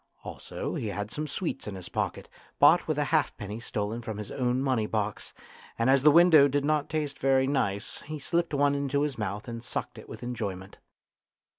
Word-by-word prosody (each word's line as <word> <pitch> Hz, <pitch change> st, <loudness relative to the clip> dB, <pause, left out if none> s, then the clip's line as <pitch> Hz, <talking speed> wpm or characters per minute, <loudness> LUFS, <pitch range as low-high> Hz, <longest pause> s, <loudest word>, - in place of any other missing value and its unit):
Also -, -, -6 dB
he 110 Hz, -, -3 dB
had 105 Hz, +1 st, -4 dB
some 150 Hz, +3 st, -4 dB
sweets 150 Hz, -, -4 dB
in 105 Hz, -, -5 dB
his 95 Hz, -2 st, -8 dB
pocket, -, -, -3 dB, 0.3 s
bought -, -, +6 dB
with -, -, 0 dB
a -, -, +2 dB
halfpenny 105 Hz, +2 st, 0 dB
stolen 110 Hz, 0 st, -3 dB
from 110 Hz, -2 st, -5 dB
his 105 Hz, -1 st, -6 dB
own 125 Hz, -1 st, 0 dB
money 130 Hz, -5 st, +1 dB
box, 105 Hz, -1 st, -3 dB, 0.5 s
and 115 Hz, +3 st, +3 dB
as 135 Hz, 0 st, +4 dB
the 150 Hz, -, +7 dB
window 160 Hz, -2 st, +7 dB
did 140 Hz, +1 st, 0 dB
not 150 Hz, -1 st, +1 dB
taste 150 Hz, -2 st, -3 dB
very 135 Hz, 0 st, +3 dB
nice 100 Hz, -8 st, -1 dB
he 155 Hz, 0 st, -4 dB
slipped 170 Hz, +2 st, -1 dB
one 140 Hz, 0 st, +3 dB
into 140 Hz, 0 st, 0 dB
his 140 Hz, -5 st, -3 dB
mouth 105 Hz, 0 st, -3 dB
and 115 Hz, -1 st, -6 dB
sucked -, -, -5 dB
it -, -, -13 dB
with -, -, -9 dB
enjoyment. 100 Hz, -6 st, -5 dB
130 Hz, 195 wpm, -28 LUFS, 105-145 Hz, 0.5 s, the